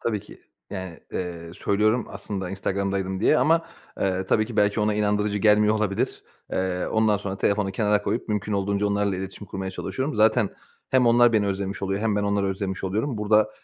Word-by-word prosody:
Tabii 110 Hz, -3 st, -1 dB
ki. -, -, -15 dB, 0.3 s
Yani, 95 Hz, -4 st, -6 dB
eee, 85 Hz, -2 st, -4 dB
söylüyorum 110 Hz, +6 st, +1 dB
aslında 95 Hz, -3 st, -5 dB
Instagram'daydım 95 Hz, 0 st, -2 dB
diye 155 Hz, -, +4 dB
ama, 165 Hz, +1 st, +3 dB, 0.3 s
eee, 95 Hz, -1 st, 0 dB
tabii 110 Hz, +3 st, +2 dB
ki 115 Hz, -1 st, -8 dB
belki 105 Hz, +1 st, +3 dB
ona 105 Hz, 0 st, +1 dB
inandırıcı 105 Hz, 0 st, +1 dB
gelmiyor 105 Hz, 0 st, +4 dB
olabilir. 105 Hz, -2 st, -1 dB, 0.3 s
Eee, 95 Hz, -1 st, -1 dB
ondan 110 Hz, -1 st, +2 dB
sonra 100 Hz, -1 st, -5 dB
telefonu 100 Hz, -1 st, +1 dB
kenara 105 Hz, +1 st, +1 dB
koyup 115 Hz, -, -2 dB
mümkün 105 Hz, 0 st, -1 dB
olduğunca 100 Hz, +1 st, 0 dB
onlarla 100 Hz, -1 st, 0 dB
iletişim 95 Hz, +2 st, -7 dB
kurmaya 95 Hz, 0 st, -5 dB
çalışıyorum. 130 Hz, +10 st, -3 dB
Zaten 110 Hz, 0 st, +3 dB, 0.4 s
hem 130 Hz, -2 st, +4 dB
onlar 120 Hz, 0 st, +5 dB
beni 105 Hz, -2 st, +2 dB
özlemiş 100 Hz, 0 st, -3 dB
oluyor 95 Hz, +1 st, -1 dB
hem 110 Hz, -2 st, +1 dB
ben 105 Hz, -, +1 dB
onları 100 Hz, -1 st, +1 dB
özlemiş 95 Hz, 0 st, -3 dB
oluyorum. 110 Hz, +5 st, -1 dB
Burada 105 Hz, 0 st, +3 dB
100 Hz, 180 wpm, -25 LUFS, 95-110 Hz, 0.4 s, onlar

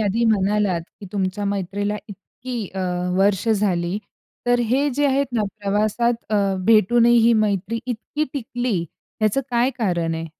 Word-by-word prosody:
आधी 220 Hz, +3 st, +1 dB
म्हणालात 205 Hz, -3 st, +2 dB, 0.2 s
की 200 Hz, -, -8 dB
तुमच्या 195 Hz, 0 st, -2 dB
मैत्रीला 200 Hz, +1 st, -2 dB
इतकी 230 Hz, +2 st, -7 dB
अ, 190 Hz, -, -3 dB, 0.4 s
वर्ष 200 Hz, +2 st, +2 dB
झाली. 195 Hz, -3 st, +1 dB, 0.5 s
तर 245 Hz, 0 st, +3 dB
हे 275 Hz, +4 st, +2 dB
जे 290 Hz, 0 st, +2 dB
आहेत 275 Hz, -1 st, +1 dB
ना 220 Hz, -, +2 dB, 0.2 s
प्रवासात 215 Hz, +4 st, 0 dB
अ, -, -, +4 dB, 0.3 s
भेटूनही 230 Hz, +2 st, +5 dB
ही 230 Hz, +1 st, +5 dB
मैत्री 205 Hz, +2 st, -1 dB
इतकी 255 Hz, +5 st, -3 dB
टिकली 245 Hz, -5 st, -2 dB, 0.4 s
याचं 215 Hz, +5 st, +2 dB
काय 245 Hz, +2 st, +2 dB
कारण 175 Hz, -7 st, 0 dB
आहे? 165 Hz, 0 st, -4 dB
210 Hz, 145 wpm, -22 LUFS, 195-240 Hz, 0.5 s, भेटूनही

